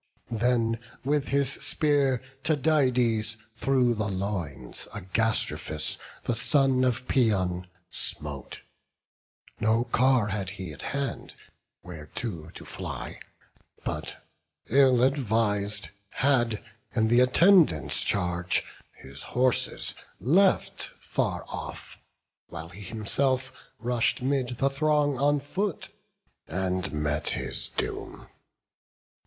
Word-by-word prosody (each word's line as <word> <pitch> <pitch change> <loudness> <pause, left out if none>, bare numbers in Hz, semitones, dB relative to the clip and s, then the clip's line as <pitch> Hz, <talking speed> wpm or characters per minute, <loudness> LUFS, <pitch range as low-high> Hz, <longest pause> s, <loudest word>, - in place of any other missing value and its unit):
Then 115 0 +1 0.3
with 145 0 +1
his 140 -1 +3
spear 140 -5 +1 0.2
Tydides 125 -8 +2 0.2
through 125 -1 +2
the 110 -2 -2
loins 95 -10 -4
Agastrophus, 95 -6 0 0.3
the 120 - 0
son 135 +1 +3
of 125 0 0
Paeon, 95 -8 +1 0.2
smote; 70 -4 +1 1.0
No 110 +2 +3
car 125 -2 +3
had 95 -2 -2
he 90 -6 -6
at - - -8
hand, 140 -1 -4 0.5
whereto 85 +1 -6
to - - -10
fly: - - -6 0.7
But, - - -4 0.5
ill 130 -3 +5
advis'd, 105 -6 +1 0.2
had 120 -6 +1 0.3
in 110 -2 +3
th' 120 +1 +5
attendants' 155 - +5
charge 90 -2 +1 0.3
His 70 +1 -10
horses 125 0 +1 0.3
left 185 - +2
far - - -2
off; - - -8 0.5
while 85 -1 -8
he 95 +4 -11
himself 130 +6 -1 0.2
Rush'd 120 +1 +1
'mid 130 -2 +1
the 135 - +2
throng 145 -1 +1
on 145 +1 +3
foot, 185 +7 -3 0.6
and 90 +2 -2
met 75 0 -1
his - - -3
doom. - - -4
120 Hz, 100 wpm, -27 LUFS, 95-135 Hz, 1.0 s, ill